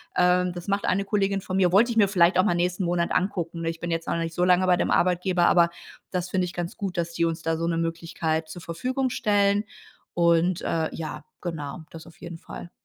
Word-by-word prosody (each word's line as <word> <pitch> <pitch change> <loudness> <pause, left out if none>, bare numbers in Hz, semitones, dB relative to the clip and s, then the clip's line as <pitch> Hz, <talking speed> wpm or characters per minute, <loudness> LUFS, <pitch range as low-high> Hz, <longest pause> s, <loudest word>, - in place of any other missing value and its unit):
Ähm, 180 0 +3
das 175 +1 -8
macht 200 0 0
eine 195 +2 +1
Kollegin 195 -1 0
von 190 -1 -3
mir, 180 -2 +3
wollte 220 +6 +4
ich 230 - -3
mir 205 -2 +5
vielleicht 180 -2 +3
auch - - +6
mal 175 - +2
nächsten 180 +2 0
Monat 170 0 0
angucken, 175 -3 -1
ne? 165 - -1
Ich 165 0 -6
bin 170 0 -4
jetzt 165 0 -2
auch - - 0
noch 170 - -1
nicht 165 - -5
so 175 - 0
lange 180 +1 +4
bei 180 -1 +4
dem - - 0
Arbeitgeber, 180 0 +2
aber 170 -1 +5 0.4
das 180 -1 -3
finde 185 -1 +1
ich 175 - -7
ganz 175 0 -4
gut, 195 -2 -4
dass 170 0 -2
die 170 0 +1
uns 165 0 -3
da 165 0 0
so 165 - -2
'ne 170 -1 0
Möglichkeit 165 -1 -2
zur 175 +1 -9
Verfügung 255 +10 -2
stellen. 205 0 +2 0.5
Und, 170 +1 +2
äh, 160 -1 -1
ja, 155 -2 -6 0.2
genau, 160 -2 -5
das 165 0 -11
auf 165 +3 -17
jeden 170 -1 -8
Fall. 175 - -10
175 Hz, 245 wpm, -25 LUFS, 165-185 Hz, 0.5 s, auch